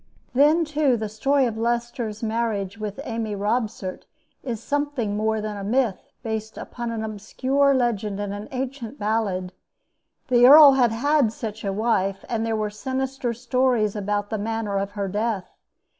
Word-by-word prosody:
Then, 300 +6 +4
too, 295 -4 +2
the 215 -1 -3
story 270 +6 +1
of 225 -2 -3
Leicester's 235 -1 -2
marriage 220 -3 -2
with 210 +2 -5
Amy 225 -4 -3
Robsart 210 -2 -2 0.3
is 235 -4 -4
something 285 -4 -2
more 220 +1 0
than 210 0 -4
a 200 - -5
myth, 230 -1 0
based 220 -1 -4
upon 240 -1 -5
an 225 -1 -3
obscure 260 +6 +1
legend 215 -5 0
and 205 -1 -3
an 205 +1 -6
ancient 260 -1 -5
ballad. 205 -4 -1 0.8
The 245 -1 +6
earl 290 +1 +10
had 250 -4 +3
had 275 +1 +2
such 220 -3 -6
a 200 - -1
wife, 195 -2 0
and 225 -2 -1
there 225 -1 0
were 215 -1 -2
sinister 260 +3 -3
stories 245 -3 +1
about 205 0 -2
the 220 - -1
manner 215 -2 -2
of 200 +1 -4
her 200 -1 -2
death. 205 -1 -2
225 Hz, 160 wpm, -24 LUFS, 210-255 Hz, 0.8 s, earl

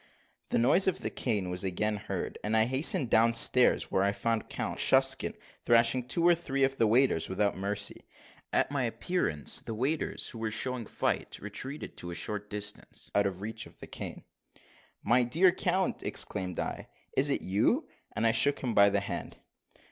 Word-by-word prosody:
The - - +1
noise 175 +12 +4
of 190 - 0
the - - -3
cane 100 -7 -2
was 90 +1 0
again 105 +3 -1
heard; 100 - -5
and 110 +1 +1
I 110 - +5
hastened 130 +2 +2
downstairs, 115 +2 +4
where 95 - +1
I 100 +1 +2
found 115 +2 -2
Count - - -4
Shucksen - - +3 0.3
thrashing 120 +1 +3
two 170 +5 +2
or 175 - +7
three 140 -5 -2
of 135 0 +1
the 115 - +3
waiters 115 -7 +2
without 100 +2 0
mercy. 100 +1 -2 0.4
At - - +1
my 140 -2 -1
appearance, 115 - -1
the 115 - -6
waiters, 135 +7 -2
who 115 - -8
were 110 -1 -2
showing 120 +1 -2
fight, - - -2
retreated 130 +8 -7
to 85 - -6
a 85 - -6
short 105 +4 -3
distance, 105 0 -4
out 100 0 +3
of 95 -1 -6
reach 110 +1 -6
of - - -20
the - - -8
cane. - - -7 0.8
"My 120 +4 +4
dear 165 +10 +4
count," 185 0 -1
exclaimed 90 -2 -2
I, - - -4 0.3
"is 140 +2 +4
it 140 - +1
you?" 120 - +1 0.3
and 115 - 0
I 115 - +5
shook 130 +5 +3
him 120 -3 -1
by 100 -1 +6
the 100 0 0
hand. 100 - -5
115 Hz, 185 wpm, -29 LUFS, 100-135 Hz, 0.8 s, or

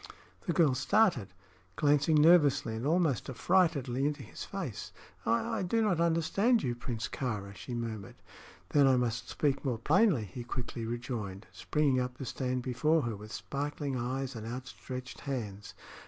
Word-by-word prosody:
The - - +2
girl 160 -6 +4
started, 175 - +3 0.5
glancing 150 +1 +3
nervously 150 -8 +5
and 115 +5 -2
almost 160 - +2
affrightedly 140 -3 +2
into 145 -1 -1
his - - -8
face. - - -5 0.4
"I 115 +1 +1
I - - -1
do 190 +5 +1
not 190 -6 +2
understand 170 +8 +2
you, 125 - 0
Prince 115 -3 -4
Kāra," 105 -7 -4
she 95 +7 -6
murmured. 110 -4 -5 0.5
"Then 145 -2 +5
I 130 -1 +5
must 115 -2 -1
speak 140 -2 0
more 130 -5 0
plainly," 160 - +3
he 105 +6 -7
quickly 120 -2 -5
rejoined, 115 -4 -4
springing 145 -4 +1
up 125 0 -3
to 135 - -5
stand 125 0 -2
before 150 +6 +2
her 115 -2 -2
with 105 +2 -10
sparkling 140 +4 -3
eyes 130 +2 -2
and 110 0 -6
outstretched 130 +1 -7
hands. 105 -7 -5
130 Hz, 155 wpm, -31 LUFS, 115-150 Hz, 0.5 s, nervously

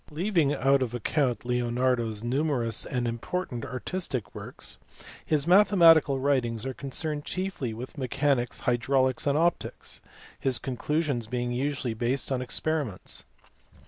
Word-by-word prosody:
Leaving 165 -2 +1
out 135 -1 +3
of 120 -2 -2
account 120 0 0
Leonardo 125 0 +1
s 110 0 -4
numerous 125 -3 +1
and 125 -2 -1
important 120 +2 -3
artistic 130 - -3
works, - - -5 0.4
his 150 -2 +1
mathematical 170 -6 +6
writings 125 -5 0
are 135 - -3
concerned 145 +3 -1
chiefly 185 -10 -3
with 125 +6 -8
mechanics, 130 -1 0
hydraulics, 130 +2 +1
and 140 +1 +3
optics 170 +2 -1 0.4
his 130 -2 +3
conclusions 140 -2 -2
being 120 +1 -2
usually 130 -1 -1
based 125 +5 0
on 130 -1 0
experiments. 140 -4 -3
130 Hz, 125 wpm, -27 LUFS, 120-150 Hz, 0.4 s, mathematical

